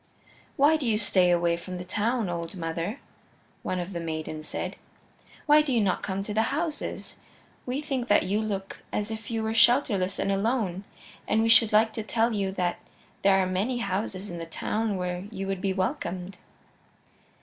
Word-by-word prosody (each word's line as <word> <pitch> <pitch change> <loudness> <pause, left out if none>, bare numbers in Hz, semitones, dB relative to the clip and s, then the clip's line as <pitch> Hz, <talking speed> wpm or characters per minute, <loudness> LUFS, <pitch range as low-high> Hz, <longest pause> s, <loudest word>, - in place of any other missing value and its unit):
"Why 295 +3 +5
do 280 -5 -3
you 215 -2 +3
stay 190 -4 +3
away 170 -1 +3
from 180 +1 -7
the 180 - -6
town, 225 +3 0
old 170 0 -4
mother?" 170 - -3 0.6
one 185 - -2
of 180 +2 -5
the 170 - -3
maidens 155 -1 -4
said. - - -4 0.7
"Why 300 0 +7
do 300 -2 -2
you 240 - +3
not 195 -4 +1
come 195 0 -2
to 210 - -5
the 220 - +3
houses? 310 +2 -3 0.5
We 260 +3 -1
think 270 -5 -2
that 205 - +4
you 205 +3 0
look 195 -3 -4
as 210 +1 -2
if 220 -1 -6
you 225 -1 -1
were 220 0 -1
shelterless 225 -6 +4
and 195 - 0
alone, 200 -2 0 0.4
and 220 +1 +2
we 225 - +2
should 230 -1 +7
like 220 +1 +4
to 220 - -3
tell 225 +2 +1
you 195 -2 0
that 180 -2 -1 0.4
there 195 -1 +5
are 190 - +3
many 195 +7 0
houses 195 -3 -3
in 175 - -6
the 165 - -6
town 215 +5 -1
where 180 0 -3
you 195 -3 -5
would 195 -1 -3
be 195 - +1
welcomed." 185 0 -3
200 Hz, 190 wpm, -27 LUFS, 180-225 Hz, 0.7 s, Why